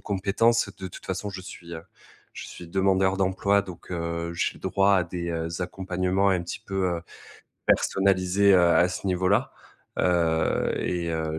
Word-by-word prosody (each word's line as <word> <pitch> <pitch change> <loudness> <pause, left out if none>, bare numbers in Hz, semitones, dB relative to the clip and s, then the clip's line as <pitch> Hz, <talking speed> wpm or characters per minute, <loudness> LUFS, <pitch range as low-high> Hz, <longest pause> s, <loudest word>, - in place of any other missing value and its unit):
compétences, 100 +3 +1
de 95 -1 -6
toute - - -12
façon, 95 +2 -3
je 95 -1 -7
suis, 85 -1 -9
heu, 80 - -7 0.5
je - - -8
suis 85 - -10
demandeur 95 +1 +2
d'emploi, 100 +1 +2
donc, 90 -3 -11
heu, 85 -1 -3
j'ai - - -1
droit 100 0 +2
à 90 - +2
des, 85 -1 -5
heu, 80 0 -2
accompagnements 95 +1 0
un 90 -2 +1
petit 85 - -6
peu, 95 -1 -2
heu, - - -11 0.6
personnalisés, 95 +1 +3
heu, 90 - +6
à 85 +1 +4
ce 95 - -5
niveau-là. 95 +7 +1 0.5
Heu 85 -2 +1
et 85 -2 -2
heu, 80 -1 -2
95 Hz, 165 wpm, -26 LUFS, 85-95 Hz, 0.6 s, heu